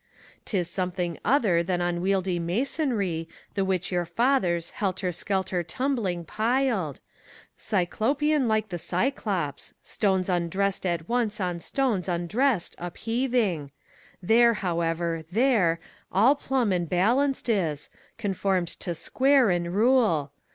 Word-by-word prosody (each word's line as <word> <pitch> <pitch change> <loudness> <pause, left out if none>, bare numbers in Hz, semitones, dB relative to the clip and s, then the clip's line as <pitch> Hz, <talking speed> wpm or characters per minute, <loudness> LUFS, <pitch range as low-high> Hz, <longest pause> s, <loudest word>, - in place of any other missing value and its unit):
T 205 - -1
is 175 -2 0
something 180 -2 -3
other 215 -10 +3
than 175 +1 -1
unwieldy 175 +1 0
masonry, 195 - -1 0.2
The 195 - 0
which 190 0 -1
your 175 -2 0
fathers, 185 -9 +1
helter 190 -2 -2
skelter 190 0 -1
tumbling, 210 - -2
piled, 220 - 0 0.6
Cyclopean 265 +9 0
like 215 -1 +1
the 175 -2 -4
Cyclops, 185 - -2
stones 190 -3 0
undressed 185 +2 0
at 170 -2 -2
once 235 -3 0
On 180 -3 -2
stones 225 -3 -1
undressed 185 +5 0
upheaving: 220 - -1 0.5
there, 235 +4 +5
however, 170 -3 -1
there 215 -7 +3 0.3
All 225 +9 +5
plumb 265 -6 0
and 175 -3 -1
balanced 250 +11 +1
is, 165 -10 -1 0.3
conformed 195 -4 0
to 175 - -3
square 265 - +3
and 175 -1 -1
rule. 215 - +3
190 Hz, 115 wpm, -26 LUFS, 175-235 Hz, 0.6 s, there